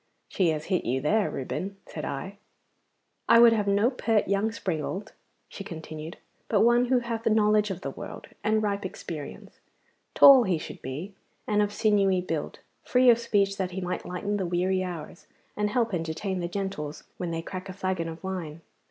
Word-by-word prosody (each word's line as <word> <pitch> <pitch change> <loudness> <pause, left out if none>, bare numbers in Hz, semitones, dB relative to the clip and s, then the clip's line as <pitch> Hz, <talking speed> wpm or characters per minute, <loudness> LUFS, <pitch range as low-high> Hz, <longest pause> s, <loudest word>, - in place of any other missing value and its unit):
'She 185 -4 +2
has 155 -1 -2
hit 185 - 0
you 130 +2 0
there, 205 +9 +2
Reuben,' 195 +9 -4
said 155 - -7
I. 195 +9 -5 0.9
'I 230 - +8
would 235 -1 +8
have 210 -2 0
no 205 +5 +3
pert 225 -4 +1
young 200 +3 +1
springald,' 190 0 -4 0.4
she 200 - -8
continued, 160 -2 -8 0.3
'but 210 - +3
one 240 +2 +5
who 255 +1 +3
hath 230 -1 -3
knowledge 210 -1 +3
of 190 - -5
the 140 - -4
world, - - -8 0.2
and 215 0 +2
ripe 205 -1 -1
experience. 165 -5 -7 0.6
Tall 270 -4 +9
he 185 -4 +1
should - - -8
be, 150 +10 -6 0.3
and 210 0 +2
of 205 0 +1
sinewy 205 -4 +2
build, 165 -4 -3 0.3
free 250 0 +5
of 235 - +3
speech 200 -4 +1
that 190 -2 -1
he - - 0
might 180 0 -3
lighten 200 +3 -3
the 190 - -1
weary 185 +2 +1
hours, 170 -3 -7 0.3
and 210 0 0
help 230 -1 0
entertain 175 +3 -2
the 175 - -2
gentles 175 -6 -4
when 180 - -3
they 165 0 -3
crack 185 +2 -7
a - - -5
flagon 185 -3 -2
of 160 0 -9
wine. 170 -4 -5
195 Hz, 185 wpm, -27 LUFS, 170-210 Hz, 0.9 s, Tall